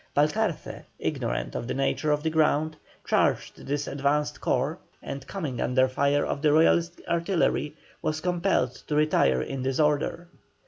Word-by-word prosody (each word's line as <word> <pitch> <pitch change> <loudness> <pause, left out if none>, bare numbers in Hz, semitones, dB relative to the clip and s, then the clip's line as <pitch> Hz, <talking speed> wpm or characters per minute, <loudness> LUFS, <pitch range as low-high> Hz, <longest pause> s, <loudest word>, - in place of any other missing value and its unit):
Balcarce, 165 +5 0
ignorant - - -2
of 115 - -4
the - - -2
nature 135 +3 0
of 150 0 0
the 160 - 0
ground, 155 0 +2 0.3
charged - - 0
this 145 +1 -1
advanced 145 +2 -1
corps, 140 +7 0 0.2
and 140 -1 -6
coming 155 -11 -4
under 130 +1 +3
fire 140 +2 +1
of 140 - -3
the 150 -1 +4
Royalist 165 +2 +3
artillery, 170 -3 0 0.3
was 155 0 -1
compelled 175 -7 +1
to 150 - -1
retire 70 - +3
in 135 - -4
disorder. 150 +5 0
150 Hz, 145 wpm, -27 LUFS, 135-160 Hz, 0.3 s, the